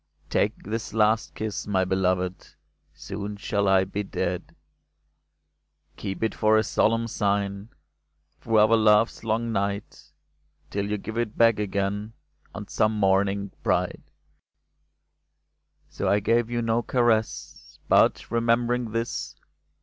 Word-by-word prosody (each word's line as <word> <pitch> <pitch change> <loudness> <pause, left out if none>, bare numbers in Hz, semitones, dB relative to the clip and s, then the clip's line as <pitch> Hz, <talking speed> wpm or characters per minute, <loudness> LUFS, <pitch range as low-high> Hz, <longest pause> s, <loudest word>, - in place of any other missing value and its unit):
" - - -43
Take - - 0
this 110 +2 -5
last 110 +1 +2
kiss, 110 -2 -4
my 95 -2 +1
beloved, 90 -1 -1 0.4
Soon 100 +1 -6
shall 100 0 -1
I 95 -1 +4
be 100 +2 -4
dead! 100 - -4 0.7
*' - - -48
Keep 95 +3 -5
it 110 - 0
for 110 0 +3
a 110 - +3
solemn 115 +2 +1
sign. 100 -1 -1 0.7
Through 115 -2 0
our 110 +2 +6
love's 110 0 +3
long 115 +1 -1
night. 100 -1 -3 0.6
Till 100 0 -2
you 105 - -1
give 110 +3 -5
it 115 -3 -3
back 115 -2 +4
again 100 +1 -2 0.4
On - - -7
some 110 +1 +1
morning 100 0 +1
bright." - - 0 1.9
So - - -3
I 100 - +3
gave 115 +3 +1
you 120 -1 -1
no 115 +1 +1
caress; 120 -3 -1
But, - - +3
remembering 115 0 +1
this. 115 +1 -3
105 Hz, 130 wpm, -25 LUFS, 100-115 Hz, 1.9 s, our